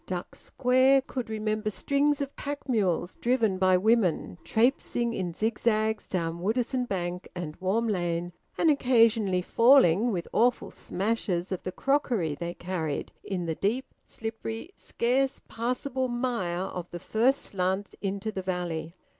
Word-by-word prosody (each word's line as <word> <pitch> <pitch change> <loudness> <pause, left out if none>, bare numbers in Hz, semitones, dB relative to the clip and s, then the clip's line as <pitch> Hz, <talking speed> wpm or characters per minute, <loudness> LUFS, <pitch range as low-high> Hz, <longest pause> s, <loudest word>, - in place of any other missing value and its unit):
Duck 180 -1 -4
Square 260 +1 +3
could 255 -4 -5
remember 215 0 -1
strings 285 +6 +1
of 280 0 -4
pack 285 0 -5
mules 190 -7 0
driven 230 -6 +1
by 185 -1 +5
women, 185 - +1
`trapesing' 235 0 +1
in 180 -2 -2
zigzags 220 0 0
down 170 -2 -2
Woodisun 245 +6 0
Bank 180 -2 -3
and 165 -4 -5
Warm 200 +5 0
Lane, 175 -3 -1 0.2
and 325 - +4
occasionally 225 -8 +3
falling, 230 -2 +5
with 175 -4 -3
awful 245 +2 +2
smashes 195 -3 -2
of 185 - -2
the 185 - -4
crockery 245 - 0
they 170 +4 -5
carried, 170 -5 -3
in 180 -3 -3
the 165 - -1
deep, 220 +10 -2
slippery, 225 - -6
scarce 265 +3 0
passable 255 +3 -2
mire 240 -8 -1
of 180 -2 -5
the 175 - -6
first 240 +9 +1
slants 190 +1 -2
into 200 +2 -2
the 195 - -4
valley. 175 -3 -3
215 Hz, 140 wpm, -28 LUFS, 180-245 Hz, 0.2 s, by